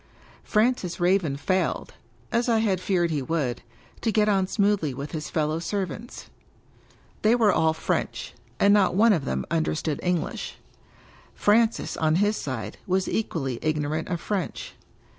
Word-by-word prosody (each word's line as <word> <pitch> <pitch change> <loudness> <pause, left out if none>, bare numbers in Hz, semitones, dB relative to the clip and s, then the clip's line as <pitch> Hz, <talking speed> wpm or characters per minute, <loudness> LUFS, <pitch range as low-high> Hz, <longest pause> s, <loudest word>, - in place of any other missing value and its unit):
Francis 215 -6 +1
Raven 175 -5 +2
failed 185 +6 -1 0.4
(as 235 +1 +1
I 230 - +4
had 200 -5 +1
feared 175 -3 +1
he 150 -3 0
would) 135 -4 -1 0.4
to 225 - +1
get 215 -1 +3
on 195 -3 +2
smoothly 200 - +1
with 140 +3 -6
his 155 -2 -4
fellow 155 0 0
serv 185 +2 -2
ants. 235 +3 -9 1.0
They 220 +2 +4
were 220 -4 +4
all 160 0 +3
French; - - -2 0.3
and 200 0 +5
not 195 -3 +3
one 220 +2 +6
of 155 -7 -1
them - - -2
under 160 -2 +1
stood 155 -2 -2
English. 180 -2 -2 0.8
Francis, 225 +2 +2
on 155 0 +2
his 205 +4 +2
side, 115 - -5
was 190 0 +1
equally 135 - -2
ignorant 155 0 -1
of 170 - -2
French. 195 0 -3
180 Hz, 155 wpm, -25 LUFS, 155-210 Hz, 1.0 s, one